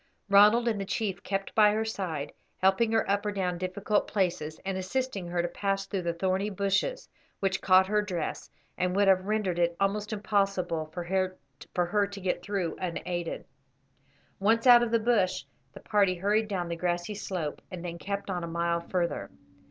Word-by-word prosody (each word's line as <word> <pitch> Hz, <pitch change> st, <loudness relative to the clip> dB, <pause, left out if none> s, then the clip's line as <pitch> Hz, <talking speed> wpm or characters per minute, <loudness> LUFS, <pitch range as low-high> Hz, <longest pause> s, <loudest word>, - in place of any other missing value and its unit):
Ronald 210 Hz, +4 st, +6 dB
and 215 Hz, -4 st, 0 dB
the -, -, -3 dB
chief 200 Hz, -2 st, -2 dB
kept 195 Hz, 0 st, -3 dB
by 210 Hz, -1 st, +5 dB
her 220 Hz, +1 st, 0 dB
side, 180 Hz, -9 st, -4 dB, 0.2 s
helping 190 Hz, +4 st, +3 dB
her 225 Hz, -1 st, +2 dB
up 200 Hz, +1 st, +1 dB
or 210 Hz, -, -1 dB
down 180 Hz, -3 st, -2 dB
difficult 200 Hz, +3 st, 0 dB
places, 170 Hz, -6 st, -1 dB
and 195 Hz, -1 st, -2 dB
assisting 195 Hz, 0 st, -2 dB
her 175 Hz, 0 st, -1 dB
to -, -, 0 dB
pass 195 Hz, +2 st, -2 dB
through 195 Hz, -1 st, -3 dB
the 170 Hz, -1 st, -1 dB
thorny 190 Hz, +4 st, 0 dB
bushes, 200 Hz, -, -1 dB, 0.3 s
which 195 Hz, -1 st, 0 dB
caught 185 Hz, 0 st, +6 dB
her 210 Hz, +2 st, +1 dB
dress, 180 Hz, -6 st, -4 dB, 0.3 s
and 180 Hz, 0 st, 0 dB
would 200 Hz, 0 st, +3 dB
have 190 Hz, 0 st, +4 dB
rendered 210 Hz, -5 st, 0 dB
it 170 Hz, 0 st, +2 dB
almost 205 Hz, +2 st, 0 dB
impossible 195 Hz, -6 st, 0 dB
for 175 Hz, +3 st, -6 dB
her 185 Hz, +2 st, -1 dB
to 200 Hz, +1 st, -8 dB
get 185 Hz, -2 st, -1 dB
through 180 Hz, -3 st, -2 dB
unaided. 175 Hz, -1 st, -3 dB, 0.9 s
Once 225 Hz, +4 st, +2 dB
out 245 Hz, -1 st, +9 dB
of 240 Hz, -, +1 dB
the 230 Hz, -, +3 dB
bush, 205 Hz, -5 st, +1 dB, 0.3 s
the -, -, -10 dB
party 200 Hz, -3 st, +2 dB
hurried 210 Hz, +4 st, +1 dB
down 185 Hz, -4 st, -2 dB
the 170 Hz, -, -3 dB
grassy 175 Hz, +3 st, -2 dB
slope, 180 Hz, -7 st, -4 dB
and 180 Hz, -1 st, -7 dB
then 170 Hz, -1 st, -5 dB
kept 200 Hz, +1 st, -4 dB
on 175 Hz, -2 st, -2 dB
a -, -, -3 dB
mile 170 Hz, 0 st, 0 dB
further. 175 Hz, 0 st, -2 dB
190 Hz, 185 wpm, -28 LUFS, 175-205 Hz, 0.9 s, out